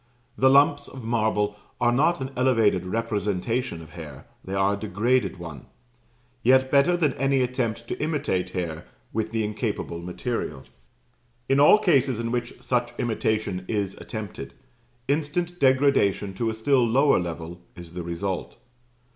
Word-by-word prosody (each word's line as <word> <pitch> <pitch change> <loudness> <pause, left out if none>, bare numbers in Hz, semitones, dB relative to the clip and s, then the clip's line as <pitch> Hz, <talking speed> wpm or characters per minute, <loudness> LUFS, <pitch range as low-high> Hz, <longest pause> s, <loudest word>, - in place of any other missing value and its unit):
The 130 - +4
lumps 145 +1 +4
of 130 -3 -10
marble 110 -3 0 0.2
are 120 -1 +3
not 150 +5 +2
an 130 +1 -4
elevated 115 -8 +2
representation 105 -1 -2
of 80 - -14
hair 75 -6 -10 0.2
they 95 - -5
are 95 +1 +2
a - - 0
degraded 110 +4 0
one; 85 -6 -9 0.7
yet 130 +2 +4
better 145 +5 +4
than 150 -6 +2
any 135 0 +2
attempt 115 -2 -2
to - - -4
imitate 145 - -1
hair 85 -3 -4 0.3
with 110 0 -1
the 115 -1 0
incapable 105 -5 -3
material. 85 - -4 0.8
In 135 +1 +3
all 150 +8 +8
cases 140 - +2
in 115 0 -3
which 120 -1 -4
such 120 -1 0
imitation 110 -5 -1
is 100 -3 -1
attempted, 110 -4 -7 0.5
instant 160 +5 -1
degradation 130 - +3
to 115 +4 -1
a 110 - -3
still 125 +3 +3
lower 135 +5 +4
level 85 0 -6
is 85 -2 -10
the 90 - -4
result. 85 +2 -4
115 Hz, 145 wpm, -25 LUFS, 95-130 Hz, 0.8 s, all